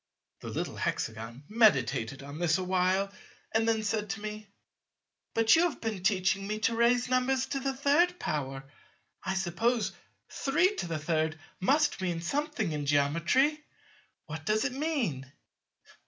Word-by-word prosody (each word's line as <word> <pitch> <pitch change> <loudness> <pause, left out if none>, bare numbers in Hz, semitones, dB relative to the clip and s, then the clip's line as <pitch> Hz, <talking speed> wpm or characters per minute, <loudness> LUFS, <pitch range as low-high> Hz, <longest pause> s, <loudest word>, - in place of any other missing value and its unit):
The - - -9
little - - -4
Hexagon 115 +4 -3
meditated 135 - +2
on 140 +2 -8
this 170 -2 +2
a 185 - -2
while 185 +2 +1 0.4
and 225 +1 +2
then 220 -1 +1
said 210 0 -1
to 205 +2 -3
me; 215 0 -6 0.9
"But 225 0 +6
you 325 - +4
have - - -10
been 220 -4 -3
teaching 195 0 +1
me 215 +1 -2
to 230 - +2
raise 240 +2 +3
numbers 255 +1 +1
to 275 - -1
the 270 0 -2
third 305 +6 +3
power: 135 -2 -3 0.6
I 190 - -1
suppose 195 +4 0 0.4
33 170 - 0 0.3
must 270 +4 +2
mean 175 -3 -1
something 275 - -1
in 145 -2 -3
Geometry; 170 - +2 0.6
what 155 0 -7
does 215 +6 +1
it 265 - -1
mean?" 250 - -2
205 Hz, 140 wpm, -30 LUFS, 160-255 Hz, 0.9 s, But